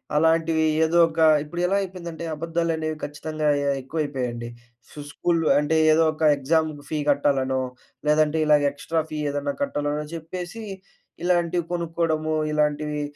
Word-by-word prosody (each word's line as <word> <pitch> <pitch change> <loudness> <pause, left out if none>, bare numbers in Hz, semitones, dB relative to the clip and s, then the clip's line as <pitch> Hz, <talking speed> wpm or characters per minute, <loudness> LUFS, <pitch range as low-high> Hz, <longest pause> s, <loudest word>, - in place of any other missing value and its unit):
అలాంటివి 160 0 +3 0.2
ఏదో 170 +2 +1
ఒక 160 - -6 0.2
ఇప్పుడు 175 +4 -5
ఎలా 195 - +1
అయిపోయిందంటే 170 -3 -6
అబద్ధాలనేవి 165 -1 -2
ఖచ్చితంగా 155 +1 -4
అయ్య 145 0 -1
య్ - - -3
ఎక్కువైపోయాయండి. 130 -5 -3 0.4
సు - - -11
స్కూల్‌లో 165 0 0
అంటే 150 +2 0 0.2
ఏదో 160 +1 +4
ఒక 155 - -15 0.2
ఎగ్జామ్ 160 +3 +1 0.2
ఫీ 155 - -2
కట్టాలనో, 135 -2 +1 0.5
లేదంటే 155 +1 +3
ఇలాగ 150 -1 +5
ఎక్స్‌ట్రా 160 +3 -2
ఫీ 155 - -3
ఏదన్నా 145 0 -2
కట్టాలనో, 150 - -1
చెప్పేసి 180 +6 -7 0.6
ఇలాంటివి 175 -1 +1
కొనుక్కోడము, 165 -2 -1 0.2
ఇలాంటివి 150 0 0
155 Hz, 130 wpm, -24 LUFS, 150-165 Hz, 0.6 s, ఇలాగ